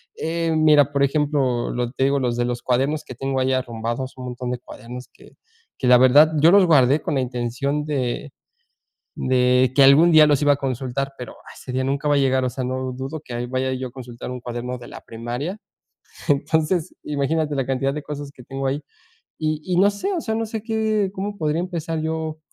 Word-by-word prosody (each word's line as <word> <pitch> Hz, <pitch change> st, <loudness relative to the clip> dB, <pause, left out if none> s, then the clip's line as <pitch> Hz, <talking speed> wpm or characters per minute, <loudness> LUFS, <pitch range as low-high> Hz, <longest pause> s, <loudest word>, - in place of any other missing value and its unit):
Eh, 165 Hz, 0 st, -1 dB
mira, 150 Hz, -2 st, +5 dB
por 140 Hz, -1 st, +1 dB
ejemplo, 140 Hz, -4 st, +1 dB
lo 125 Hz, 0 st, -1 dB
que 120 Hz, -, -11 dB
te -, -, +1 dB
digo, 140 Hz, +1 st, +2 dB
los 125 Hz, -2 st, -1 dB
de 120 Hz, -, +1 dB
los 120 Hz, 0 st, -3 dB
cuadernos 135 Hz, +5 st, 0 dB
que -, -, -8 dB
tengo 135 Hz, +2 st, -2 dB
ahí 130 Hz, 0 st, +1 dB
arrumbados, 120 Hz, +1 st, -3 dB
un 130 Hz, -, -7 dB
montón 125 Hz, 0 st, -5 dB
de 125 Hz, -, -2 dB
cuadernos 125 Hz, 0 st, -10 dB
que -, -, -19 dB, 0.4 s
que 130 Hz, -, -1 dB
la 125 Hz, 0 st, +8 dB
verdad, 145 Hz, +5 st, +6 dB
yo 165 Hz, +3 st, +7 dB
los 200 Hz, 0 st, +6 dB
guardé 145 Hz, -3 st, +4 dB
con -, -, -3 dB
la 135 Hz, -, +1 dB
intención 130 Hz, +4 st, -2 dB
de 140 Hz, -1 st, -3 dB, 0.8 s
de 125 Hz, 0 st, +2 dB
que 140 Hz, -, +7 dB
algún 140 Hz, +6 st, +7 dB
día 155 Hz, -1 st, +8 dB
los 145 Hz, -2 st, +3 dB
iba 145 Hz, -1 st, +5 dB
a -, -, -5 dB
consultar, 135 Hz, 0 st, -3 dB
pero 125 Hz, -, -8 dB, 0.2 s
ese -, -, -10 dB
día 130 Hz, +1 st, -1 dB
nunca 140 Hz, +3 st, -1 dB
va 145 Hz, -, +4 dB
a -, -, +3 dB
llegar. 130 Hz, -1 st, +2 dB
O -, -, -1 dB
sea, 130 Hz, +1 st, -4 dB
lo 130 Hz, 0 st, -3 dB
dudo 135 Hz, +5 st, -6 dB
que 120 Hz, -3 st, -5 dB
vaya 130 Hz, +1 st, -1 dB
yo 130 Hz, 0 st, -4 dB
a -, -, -15 dB
consultar 125 Hz, -2 st, -8 dB
un 125 Hz, 0 st, -6 dB
cuaderno 120 Hz, +1 st, -5 dB
de 120 Hz, -, -11 dB
la -, -, -10 dB
primaria. 120 Hz, -, -5 dB, 0.7 s
Entonces, 155 Hz, +3 st, +1 dB
imagínate 150 Hz, +1 st, -1 dB
la 135 Hz, -2 st, 0 dB
cantidad 135 Hz, +1 st, -1 dB
de 150 Hz, -, -5 dB
cosas 145 Hz, -1 st, -6 dB
que 130 Hz, -, -15 dB
tengo 135 Hz, +2 st, -5 dB
ahí 135 Hz, +2 st, -1 dB, 0.6 s
y 155 Hz, -1 st, -2 dB
y 185 Hz, -, -1 dB
no 195 Hz, +3 st, +5 dB
sé, 205 Hz, -, -3 dB
o 340 Hz, -, -2 dB
sea, 220 Hz, -, -3 dB
no 225 Hz, 0 st, -1 dB
sé 220 Hz, -1 st, -5 dB
qué 220 Hz, -3 st, 0 dB
cómo 205 Hz, +1 st, -4 dB
podría 155 Hz, -1 st, 0 dB
empezar 165 Hz, -3 st, -3 dB
yo 160 Hz, 0 st, -3 dB
135 Hz, 220 wpm, -22 LUFS, 125-155 Hz, 0.8 s, la